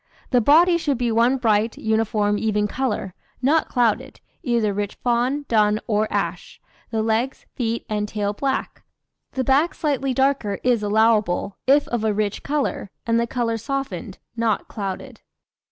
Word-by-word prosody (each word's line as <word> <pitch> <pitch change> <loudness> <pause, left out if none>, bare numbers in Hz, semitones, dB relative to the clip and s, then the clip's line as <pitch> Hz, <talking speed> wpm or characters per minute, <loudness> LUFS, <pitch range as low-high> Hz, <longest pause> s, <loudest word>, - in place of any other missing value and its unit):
The 250 -2 +4
body 340 +7 +5
should 285 -5 0
be 240 -1 0
one 235 +4 +3
bright, 225 -2 +1
uniform, 215 -2 +1
even 210 -1 +1
colour, 210 -6 -2 0.3
not 295 +5 +2
clouded, 240 -4 0 0.2
either 235 - +1
rich 205 0 -3
fawn, 250 +4 0
dun, 215 -2 +3
or 215 0 0
ash. - - -3 0.3
The 220 -1 -1
legs, 225 +4 -1
feet, 230 -2 -2
and 210 -1 -1
tail 205 -1 -2
black. 270 +5 -2 0.5
The 260 - -1
back 275 +7 +2
slightly 275 -4 -1
darker 265 -7 +1
is 245 -3 +2
allowable, 210 -2 +2
if 280 +2 +4
of 240 -2 -1
a 215 -2 +1
rich 210 -1 -1
colour, 285 -8 -2 0.2
and 230 0 +2
the 235 - 0
colour 230 -2 -1
softened, 225 -6 -4 0.2
not 230 -2 0
clouded. 215 +4 -6
230 Hz, 155 wpm, -22 LUFS, 210-265 Hz, 0.5 s, body